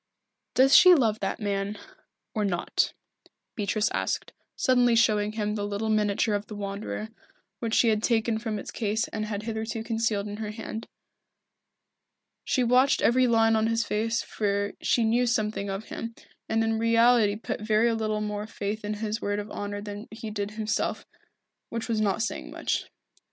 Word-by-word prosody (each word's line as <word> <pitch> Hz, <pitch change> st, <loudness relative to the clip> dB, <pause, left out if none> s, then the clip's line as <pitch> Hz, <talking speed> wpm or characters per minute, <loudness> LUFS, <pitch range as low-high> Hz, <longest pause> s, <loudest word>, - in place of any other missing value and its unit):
"Does 270 Hz, +2 st, +6 dB
she 365 Hz, 0 st, +9 dB
love 225 Hz, -7 st, +2 dB
that 195 Hz, -, -2 dB
man 200 Hz, 0 st, -2 dB, 0.6 s
or 215 Hz, -, 0 dB
not?" 185 Hz, -4 st, 0 dB, 0.6 s
Beatrice 210 Hz, 0 st, 0 dB
asked, -, -, -2 dB, 0.2 s
suddenly 245 Hz, -2 st, +3 dB
showing 215 Hz, -2 st, +3 dB
him 210 Hz, -1 st, -1 dB
the 210 Hz, -1 st, -2 dB
little 205 Hz, +2 st, -2 dB
miniature 210 Hz, 0 st, +1 dB
of 205 Hz, 0 st, -2 dB
the 210 Hz, -, -7 dB
Wanderer, 205 Hz, +2 st, -4 dB, 0.5 s
which 230 Hz, -1 st, -1 dB
she 235 Hz, -, +5 dB
had 215 Hz, -1 st, +2 dB
taken 225 Hz, -1 st, +1 dB
from 220 Hz, -2 st, -3 dB
its -, -, -7 dB
case 220 Hz, 0 st, -1 dB
and 215 Hz, -1 st, -3 dB
had 210 Hz, -1 st, -4 dB
hitherto 220 Hz, 0 st, -3 dB
concealed 225 Hz, -3 st, 0 dB
in 205 Hz, 0 st, -6 dB
her 215 Hz, -1 st, -4 dB
hand. 220 Hz, +1 st, -6 dB, 1.6 s
She 255 Hz, -, +1 dB
watched 250 Hz, +3 st, +4 dB
every 255 Hz, +2 st, +4 dB
line 225 Hz, -1 st, +4 dB
of 220 Hz, 0 st, +2 dB
his 230 Hz, 0 st, +1 dB
face 225 Hz, +2 st, 0 dB
for 200 Hz, -1 st, -1 dB
she 235 Hz, -, +2 dB
knew 235 Hz, +3 st, +2 dB
something 215 Hz, -3 st, 0 dB
of 195 Hz, +2 st, -5 dB
him, 230 Hz, 0 st, -6 dB, 0.3 s
and 225 Hz, 0 st, +2 dB
in 225 Hz, 0 st, 0 dB
reality 230 Hz, -2 st, +4 dB
put 215 Hz, -, -5 dB
very 220 Hz, +2 st, +3 dB
little 215 Hz, -1 st, -1 dB
more 210 Hz, 0 st, -3 dB
faith 210 Hz, 0 st, -4 dB
in 210 Hz, 0 st, -2 dB
his 215 Hz, +1 st, -3 dB
word 205 Hz, 0 st, -1 dB
of 205 Hz, 0 st, -5 dB
honour 205 Hz, 0 st, -4 dB
than 205 Hz, +1 st, -7 dB
he 220 Hz, 0 st, -7 dB
did 205 Hz, -1 st, -3 dB
himself, 220 Hz, 0 st, -1 dB, 0.6 s
which 230 Hz, -1 st, -4 dB
was 225 Hz, -2 st, 0 dB
not 205 Hz, +1 st, +1 dB
saying 230 Hz, -, -4 dB
much. -, -, -2 dB
220 Hz, 170 wpm, -27 LUFS, 205-230 Hz, 1.6 s, she